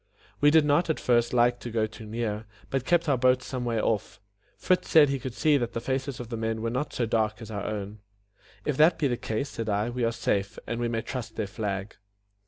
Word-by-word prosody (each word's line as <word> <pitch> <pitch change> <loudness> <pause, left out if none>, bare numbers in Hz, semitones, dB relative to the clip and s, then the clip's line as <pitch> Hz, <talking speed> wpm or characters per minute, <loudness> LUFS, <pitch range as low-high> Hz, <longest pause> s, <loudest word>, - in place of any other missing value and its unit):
We 145 - +6
did 155 0 +5
not 150 +4 +2
at 160 - 0
first 120 -1 +2
like 120 0 +3
to 120 - -6
go 110 -1 +1
too 110 0 -10
near, 110 -1 -3 0.2
but 135 -1 -1
kept 170 -2 +2
our 135 -4 +2
boat 125 0 +3
some 125 -2 -4
way 115 -2 0
off. 110 -2 -1 0.4
Fritz 185 -1 +1
said 150 -3 +7
he 140 -1 -1
could 125 -1 -6
see 150 -2 +3
that 120 -3 -2
the - - -2
faces 130 +2 -3
of 120 -2 -7
the 115 - -4
men 110 0 -2
were 115 - -1
not 135 +5 -2
so 120 - -1
dark 110 -1 0
as 110 -2 -9
our 100 -1 -4
own. 105 0 -5 0.7
"If 150 -3 -1
that 160 +3 +5
be 150 - +1
the 125 - 0
case," 115 +4 -3
said 115 -4 -4
I, 105 +3 0
"we 125 0 -2
are 115 - +2
safe, 100 -3 -1
and 115 - -3
we 120 - 0
may 115 -1 -2
trust 120 -5 -5
their 110 - -1
flag." 100 -1 -4
120 Hz, 245 wpm, -27 LUFS, 110-130 Hz, 0.7 s, said